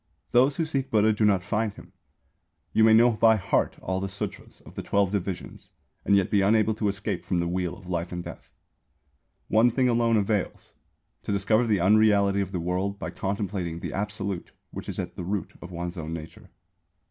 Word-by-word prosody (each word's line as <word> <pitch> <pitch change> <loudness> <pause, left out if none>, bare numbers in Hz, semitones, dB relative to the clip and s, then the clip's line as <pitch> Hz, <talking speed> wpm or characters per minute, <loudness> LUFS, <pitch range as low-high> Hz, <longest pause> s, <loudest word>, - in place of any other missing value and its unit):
Those 130 +4 +4
who 165 - 0
seek 135 -4 -2
Buddha 110 -2 +3
do 105 +1 +1
not 100 -3 +3
find 105 +1 -1
him. - - -14 0.8
You 110 - +4
may 110 - +6
know 115 +2 +6
by 110 0 +4
heart 100 - 0
all 95 0 -1
the 95 - -2
Sūtras 95 +1 -7
of - - -14
the - - -5
twelve 100 -2 +1
divisions, 95 -3 -5 0.3
and 100 - +3
yet 100 -2 +2
be 100 - +3
unable 110 +2 +3
to 110 0 -2
escape 100 0 -3
from 90 - -1
the 85 0 0
Wheel 90 0 -2
of 100 - -15
Life 85 -1 -3
and 90 -1 -4
Death. - - -10 1.0
One 110 +3 +4
thing 125 +2 +1
alone 115 -1 +2
avails 105 -1 -2 0.5
to - - -4
discover 110 +4 +2
the 105 -3 +2
unreality 100 0 +4
of 95 -1 -4
the 90 - -2
World 90 +4 -2
by - - -5
contemplating 95 -4 -3
the - - -5
Absolute 100 -2 -4 0.2
which - - -7
is - - -4
at 90 -1 -4
the 90 - -5
root 95 0 -3
of 90 - -8
one's 85 +1 -5
own 80 0 -5
nature. 80 -1 -9
100 Hz, 200 wpm, -26 LUFS, 90-110 Hz, 1.0 s, may